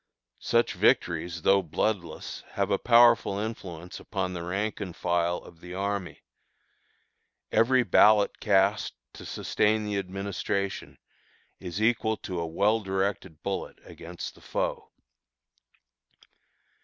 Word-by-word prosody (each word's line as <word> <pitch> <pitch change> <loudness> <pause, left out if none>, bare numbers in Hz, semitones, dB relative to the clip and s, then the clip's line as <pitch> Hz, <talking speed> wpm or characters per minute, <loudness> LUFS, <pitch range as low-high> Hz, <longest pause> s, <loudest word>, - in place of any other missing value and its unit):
Such - - +1
victories, 85 -1 +1
though 100 0 +5
bloodless, 85 0 -3
have 100 0 -1
a 100 - +2
powerful 120 -4 +5
influence 95 -5 -6
upon 95 -3 -3
the 85 - -5
rank 100 +6 -3
and 90 -4 -5
file 85 0 0
of 85 - -14
the 90 +1 -8
army. 100 -2 -3 1.3
Every 125 +2 +4
ballot 105 -2 +4
cast 100 0 +2 0.2
to - - -11
sustain 110 0 0
the 105 -1 -1
administration 100 0 -3 0.6
is 90 +1 -5
equal 110 0 +2
to 90 -2 -5
a 85 - -2
well 100 +7 +2
directed 95 -4 -3
bullet 100 -1 -4
against - - -8
the - - -19
foe. - - -3
100 Hz, 120 wpm, -27 LUFS, 90-105 Hz, 1.3 s, though